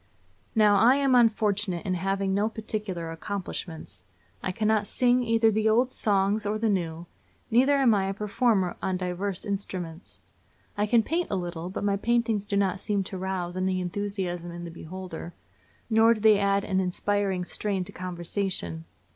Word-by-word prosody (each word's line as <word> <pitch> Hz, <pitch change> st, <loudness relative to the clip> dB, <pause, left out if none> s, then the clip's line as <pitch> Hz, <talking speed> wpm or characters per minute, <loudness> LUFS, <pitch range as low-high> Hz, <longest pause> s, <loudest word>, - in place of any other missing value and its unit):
Now, 210 Hz, -2 st, +5 dB
I 235 Hz, +6 st, +6 dB
am 275 Hz, -2 st, +2 dB
unfortunate 210 Hz, -6 st, +2 dB
in 185 Hz, -, 0 dB
having 195 Hz, +2 st, -1 dB
no 205 Hz, +3 st, +1 dB
particular 210 Hz, -7 st, -4 dB
accomplishments. 165 Hz, -, -6 dB, 0.4 s
I 185 Hz, -, -2 dB
cannot 215 Hz, +1 st, +1 dB
sing 250 Hz, 0 st, +3 dB
either 225 Hz, -1 st, +3 dB
the 220 Hz, +1 st, +2 dB
old 245 Hz, +4 st, +3 dB
songs 205 Hz, -1 st, +1 dB
or 210 Hz, +1 st, -1 dB
the 220 Hz, 0 st, 0 dB
new; 170 Hz, -3 st, -2 dB, 0.5 s
neither 260 Hz, +5 st, +4 dB
am 265 Hz, -5 st, +4 dB
I 195 Hz, -2 st, +1 dB
a 195 Hz, -, -1 dB
performer 210 Hz, -2 st, +1 dB
on 185 Hz, -1 st, -1 dB
divers 180 Hz, +2 st, -3 dB
instruments. 185 Hz, -4 st, -5 dB, 0.6 s
I 210 Hz, +1 st, 0 dB
can 230 Hz, +1 st, +4 dB
paint 340 Hz, +8 st, -1 dB
a -, -, -1 dB
little, 175 Hz, -1 st, -4 dB
but 190 Hz, -, -5 dB
my 200 Hz, -1 st, +1 dB
paintings 225 Hz, -2 st, 0 dB
do 200 Hz, -, 0 dB
not 195 Hz, -1 st, +1 dB
seem 200 Hz, -1 st, -1 dB
to 190 Hz, 0 st, -6 dB
rouse 185 Hz, -2 st, -3 dB
any 185 Hz, 0 st, 0 dB
enthusiasm 180 Hz, -2 st, -3 dB
in 175 Hz, 0 st, -7 dB
the 170 Hz, -, -7 dB
beholder, 170 Hz, 0 st, -8 dB, 0.5 s
nor 225 Hz, 0 st, +5 dB
do -, -, -7 dB
they 215 Hz, -1 st, +5 dB
add 200 Hz, 0 st, +2 dB
an 190 Hz, -2 st, 0 dB
inspiring 190 Hz, 0 st, -1 dB
strain 195 Hz, 0 st, -2 dB
to -, -, -9 dB
conversation. 175 Hz, -, -2 dB
200 Hz, 170 wpm, -27 LUFS, 180-215 Hz, 0.6 s, I